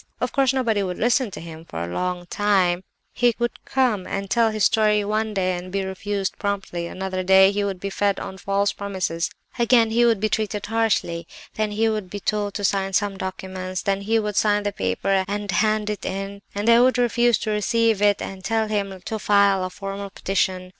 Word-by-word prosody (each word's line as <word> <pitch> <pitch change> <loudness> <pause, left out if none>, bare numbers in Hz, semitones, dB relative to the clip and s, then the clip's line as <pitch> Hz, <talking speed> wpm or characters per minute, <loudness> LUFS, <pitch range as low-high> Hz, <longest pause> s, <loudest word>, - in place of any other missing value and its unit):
Of - - -1
course 270 -2 +3
nobody 235 -6 +1
would 180 -2 -3
listen 245 +1 +2
to - - -8
him 165 -1 -9
for 85 - -6
a 85 +1 -5
long 180 - -2
time; 185 -2 +1 0.3
he 240 -2 +2
would 240 0 -3
come 235 -8 +1
and 195 0 -4
tell 230 -2 +4
his 215 -2 -1
story 210 -1 +3
one 215 +1 -1
day 185 -1 +1
and 180 +1 -7
be 195 0 -1
refused 195 +1 -3
promptly; 195 -4 -3
another 185 +1 -3
day 190 +1 +6
he 205 0 -1
would 195 -2 -3
be 195 +2 -4
fed 200 0 0
on 190 - -7
false 200 +1 0
promises; 185 -4 -2 0.3
again 235 -1 +4
he 235 +2 +3
would 230 -3 +3
be 215 - +1
treated 210 -1 -2
harshly; 205 -7 0 0.3
then 215 -1 -1
he 215 +2 +1
would 215 -4 -2
be 205 - -5
told 205 0 -1
to 205 - -3
sign 195 0 0
some 205 0 +1
documents; 185 -1 -5
then 195 0 0
he 220 +3 +1
would 210 -2 -1
sign 210 -1 +3
the 205 - -1
paper 190 - 0
and 205 -1 -3
hand 215 +2 +1
it 210 -1 -3
in, 195 +1 -4
and 205 +2 -2
they 235 0 +7
would 255 +1 +4
refuse 240 -1 +3
to 215 - -3
receive 220 0 +1
it, 205 -1 +3
and 190 -1 -7
tell 225 +1 0
him 200 -3 -2
to 220 - -3
file 200 -1 +3
a 185 - -2
formal 195 +1 -6
petition. 185 -1 -1
200 Hz, 210 wpm, -23 LUFS, 190-215 Hz, 0.3 s, they